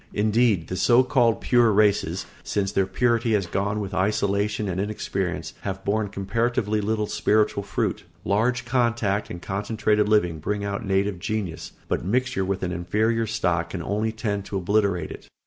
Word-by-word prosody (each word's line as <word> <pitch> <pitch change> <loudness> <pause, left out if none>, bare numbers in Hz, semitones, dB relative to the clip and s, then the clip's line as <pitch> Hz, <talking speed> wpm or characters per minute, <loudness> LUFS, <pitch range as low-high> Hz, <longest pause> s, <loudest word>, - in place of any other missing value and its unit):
Indeed 105 -3 +2
the 90 - -4
so 120 +7 +5
called 125 -3 +2
pure 120 -2 +4
races, 100 -4 +2 0.2
since 100 -1 -1
their 95 -2 +1
purity 115 +3 +1
has 100 -3 +2
gone 100 +4 -1
with 100 -2 -4
isolation 100 +2 0
and 95 0 -1
inexperience, 95 -5 -3
have 95 -1 -5
borne 105 +1 +1
comparatively 105 +2 -1
little 105 +1 0
spiritual 105 0 +1
fruit. 100 -1 -2 0.2
Large 115 +5 +1
contact 120 -5 0
and 85 - -6
concentrated 105 +2 0
living 90 -7 +2
bring 100 +6 -2
out 100 +1 -3
native 95 -1 0
genius, 100 -4 -4
but - - -1
mixture 125 +2 0
with 95 0 -2
an 90 - -1
inferior 110 +6 0
stock 90 -6 0
can 85 -3 -5
only 105 +3 -1
tend 105 -3 -2
to 100 - -3
obliterate 100 -3 +1
it. - - -10
105 Hz, 165 wpm, -24 LUFS, 95-110 Hz, 0.2 s, so